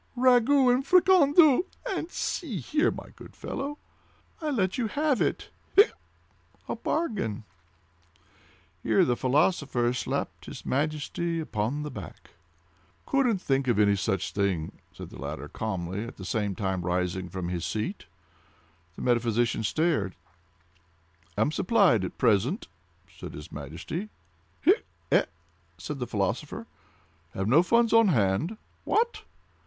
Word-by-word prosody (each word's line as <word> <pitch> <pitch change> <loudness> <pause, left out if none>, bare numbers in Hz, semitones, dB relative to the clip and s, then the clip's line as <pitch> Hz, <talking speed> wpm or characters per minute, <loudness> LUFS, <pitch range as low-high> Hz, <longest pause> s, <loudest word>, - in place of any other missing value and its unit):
"Ragout 255 +1 +5
and 255 +2 +1
fricandeau—and 350 0 +4
see 305 - -3
here, 300 - +1
my - - -7
good - - -13
fellow! 285 +2 -5 0.6
I'll 310 -2 -1
let 190 -6 0
you 235 - +1
have 285 +1 0
it—hiccup!—a 410 +4 -1
bargain." 195 - -2 1.4
Here - - +3
the 125 - +1
philosopher 130 -2 +1
slapped 125 - -3
his - - -9
Majesty 155 +4 -1
upon 130 0 -2
the 150 - -5
back. - - -10 0.7
"Couldn't 245 -9 +1
think 135 -1 +1
of 105 -4 +3
such 95 -1 -1
a - - -26
thing," 95 -6 -1
said - - -10
the - - -10
latter 75 +1 -5
calmly, 95 0 -4
at 120 - -10
the - - -8
same 105 -5 -1
time 95 -1 -2
rising 90 +1 -1
from 90 -2 -4
his 90 -2 -3
seat. 110 - -3 0.9
The - - -7
metaphysician 120 -2 +1
stared. 110 - 0 1.2
"Am 110 +8 +2
supplied 180 - +3
at 90 - -5
present," 120 - +2 0.5
said - - -8
his 75 +3 -10
Majesty. 80 - -6 0.5
"Hiccup!—e - - +1
h?" - - +4 0.5
said 140 +11 -6
the 125 - -3
philosopher. 120 - -2 0.7
"Have 95 +1 -1
no 140 +9 +6
funds 235 +5 +3
on 225 -1 +6
hand." 135 - +1 0.3
"What?" 470 +2 0
135 Hz, 125 wpm, -27 LUFS, -, 1.4 s, no